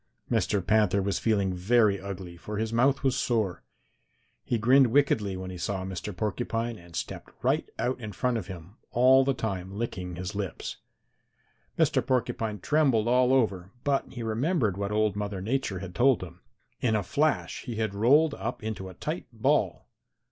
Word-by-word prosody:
"Mr. 100 -3 +1
Panther 105 -3 +3
was 100 0 0
feeling 100 -4 +1
very 100 +2 +3
ugly, 95 -3 -7
for 105 +5 -6
his 110 +1 -2
mouth 135 +5 +3
was 135 -2 +2
sore. 110 -7 0 0.8
He 120 - 0
grinned 130 +4 +5
wickedly 110 -7 +2
when 95 0 -6
he 90 - -8
saw 95 0 -2
Mr. 95 +2 -5
Porcupine 115 +1 -2
and 85 -1 -14
stepped - - -5
right - - +1
out 130 +1 -1
in 110 -3 -6
front 125 +3 0
of 95 - -8
him, 95 +2 -10
all 130 +2 +5
the 135 0 +1
time 95 -5 -3
licking 90 -6 -4
his 90 +3 -5
lips. 100 -5 -4 1.0
Mr. - - +3
Porcupine 115 -4 -1
trembled 135 -8 +2
all 125 +1 +4
over, 100 -9 +1
but 140 -1 0
he 120 -3 -6
remembered 115 - 0
what 100 +1 -3
old 105 -1 +1
Mother 105 -2 -3
Nature 110 0 -1
had 90 -1 -7
told 125 +2 +3
him. 90 0 -11 0.4
In 115 -3 +1
a 105 - +1
flash 150 +10 0
he 120 -4 -4
had 110 -2 -1
rolled 140 +9 +4
up 120 +3 -5
into 105 -4 -4
a 95 - -12
tight - - -4
ball. - - +1
110 Hz, 175 wpm, -28 LUFS, 95-125 Hz, 1.0 s, grinned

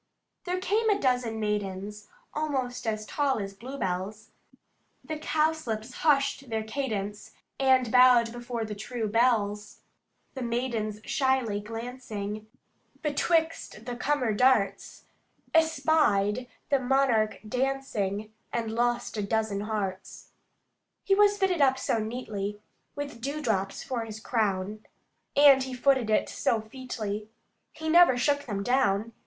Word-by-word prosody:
There 365 0 -1
came 435 +4 +1
a 410 - +4
dozen 250 - 0
maidens, 210 -1 -3 0.3
Almost 265 -6 -2
as 215 -1 -1
tall 280 +3 0
as 200 -2 -4
bluebells; 205 -3 -4 0.7
The 310 -1 -5
cowslips 305 -8 -1
hushed 275 -3 +2
their 220 -1 -1
cadence, 215 -4 -4 0.3
And 260 -3 +3
bowed 250 -2 +6
before 240 -1 -4
the 215 - -5
true 225 +2 -4
belles: 210 -2 +1 0.5
The 265 - -6
maidens 235 -3 -2
shyly 260 -6 +1
glancing, 215 -2 -6 0.6
betwixt 320 -6 0
the 245 - -4
cummer 255 -3 0
darts, 250 -2 +2 0.5
Espied 300 -9 +3 0.2
the 275 - +3
monarch 250 -4 +2
dancing, 220 -5 -2 0.2
and 225 -2 -2
lost 240 0 0
a - - 0
dozen 215 0 0
hearts. 205 -3 -4 0.7
He 390 - +2
was 410 0 +5
fitted 380 -5 +1
up 265 -1 +4
so 230 - 0
neatly, 215 -3 -4 0.4
With 285 -5 -6
dewdrops 230 -9 -2
for 240 -3 -3
his 220 -1 -8
crown, 210 -2 -1 0.5
And 280 -2 +7
he 260 0 -4
footed 260 -3 +2
it 215 - +2
so 230 - 0
featly 215 -3 -5 0.4
He 315 0 -7
never 335 -5 +6
shook 285 +3 +1
them 200 -3 -2
down. 230 -3 +1
240 Hz, 125 wpm, -28 LUFS, 215-270 Hz, 0.7 s, And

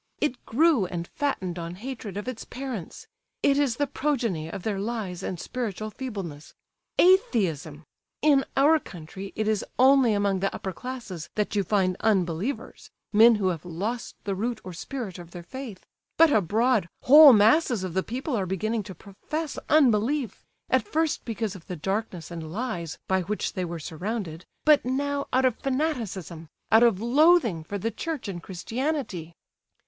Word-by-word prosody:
It 280 -4 -1
grew 280 - +3
and 170 -1 -4
fattened 190 -12 -2
on 170 +1 -5
hatred 220 -2 -7
of 205 - -5
its 255 -3 -5
parents; 250 -9 -7 0.4
it 280 0 +4
is 275 -5 +1
the 290 - +1
progeny 235 - -1
of 185 +2 -7
their 205 -3 -1
lies 200 -4 -3
and 185 -2 -4
spiritual 215 -3 -4
feebleness. 195 - -7 0.4
Atheism! 180 - +2 0.4
In 285 -3 +5
our 305 +4 +5
country 190 - -9
it 215 - -1
is 215 -2 +1
only 260 -2 +5
among 200 -2 +1
the 195 +1 0
upper 190 - -5
classes 220 -8 -7
that 210 0 -1
you 200 - +2
find 185 -1 +1
unbelievers; 190 - -1 0.2
men 225 +2 +7
who 195 -3 +1
have 165 -4 -4
lost 200 +8 -4
the 200 - -2
root 225 +4 -2
or 185 - -8
spirit 195 +1 -6
of 170 -1 -10
their 175 0 -9
faith; 225 0 -8 0.3
but 330 -1 +6
abroad 215 - +2
whole 295 +2 +10
masses 225 - +4
of 185 -3 -4
the 190 - +1
people 255 - -3
are 195 -4 -1
beginning 215 +5 -1
to 190 -2 -9
profess 290 - -5
unbelief—at 265 -2 +1
first 320 -6 -1
because 220 -3 -3
of 185 -5 -12
the 180 - -4
darkness 190 0 -3
and 160 -2 -6
lies 175 -6 -4
by 190 0 +2
which 205 +4 -3
they 185 - -2
were 170 -1 -4
surrounded; 175 +1 -5 0.2
but 305 -1 +6
now 280 +2 -1
out 260 +1 +3
of 250 -3 +2
fanaticism, 225 - -3 0.2
out 225 - +7
of 230 -6 +4
loathing 245 - +4
for 205 +5 -5
the 225 +4 -2
Church 315 -5 -4
and 180 -3 -5
Christianity!" 200 - -4
215 Hz, 165 wpm, -26 LUFS, 185-260 Hz, 0.4 s, whole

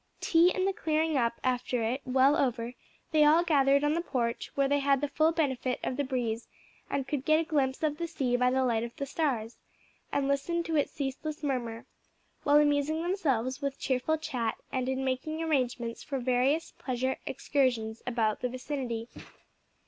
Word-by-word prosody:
Tea 340 +2 +4
and 375 +1 0
the 390 - +1
clearing 315 -2 0
up 235 -3 +1
after 250 -1 0
it 245 +5 -1
well 265 +2 +4
over, 240 -2 0 0.4
they 310 -1 +5
all 310 +3 +6
gathered 280 -4 +3
on 295 +1 +2
the 335 - 0
porch, 240 -8 -2
where 275 -1 +3
they 285 +1 +2
had 275 -1 +3
the 290 - -1
full 310 +3 +2
benefit 265 -6 -1
of 255 - -1
the 285 - 0
breeze 240 -4 -2 0.4
and 270 -2 -2
could 280 -3 -2
get 310 +2 +4
a - - +1
glimpse 280 -4 0
of 300 0 0
the 340 - -2
sea 265 -7 -1
by 250 0 +3
the 260 +1 +2
light 230 -2 +1
of 235 0 -6
the 280 - -3
stars, 260 -7 -2 0.5
and 275 -1 0
listen 310 +5 0
to 330 -1 -2
its 290 - +1
ceaseless 295 +2 -4
murmur, 240 -5 -2 0.6
while 290 0 +4
amusing 295 +2 +2
themselves 270 - 0
with 280 -1 -2
cheerful 265 +5 0
chat 255 -8 -2
and 260 -1 -1
in 265 0 -1
making 310 +5 -2
arrangements 245 -6 -1
for 275 - -4
various 260 +5 +1
pleasure 260 0 -1
excursions 235 -6 0
about 225 -3 0
the 250 - 0
vicinity. 250 -3 -4
270 Hz, 185 wpm, -29 LUFS, 250-305 Hz, 0.6 s, all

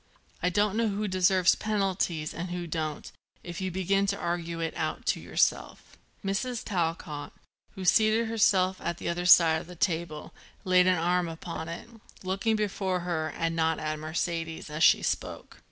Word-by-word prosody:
"I 180 - +2
don't 205 +2 +1
know 230 0 +2
who 210 +1 -2
deserves 185 -1 +4
penalties 190 -7 -1
and 175 +3 -5
who 175 0 -4
don't, 155 -2 -4 0.3
if 175 +1 -7
you 190 - -1
begin 190 +2 +1
to 200 0 0
argue 170 -1 -3
it 165 -1 -3
out 155 -2 -3
to - - -9
yourself." - - -1 0.3
Mrs. 225 +5 -2
Talcott, 165 -5 -3 0.4
who 190 - -7
had 185 - -3
seated 220 +4 +4
herself 190 -4 +2
at 170 - -3
the - - -4
other 175 +1 -1
side 165 -3 +7
of - - -13
the 180 - -10
table, 165 -3 -2 0.3
laid 185 -1 +4
an 185 -1 +4
arm 175 +1 +1
upon 165 0 -6
it, 170 +6 -7 0.4
looking 195 +4 0
before 195 -3 -1
her 160 -3 -2
and 165 0 -1
not 160 -1 +1
at 155 0 -3
Mercedes, 165 0 -3
as 155 +2 -1
she - - +6
spoke. - - -4
175 Hz, 175 wpm, -28 LUFS, 165-195 Hz, 0.4 s, side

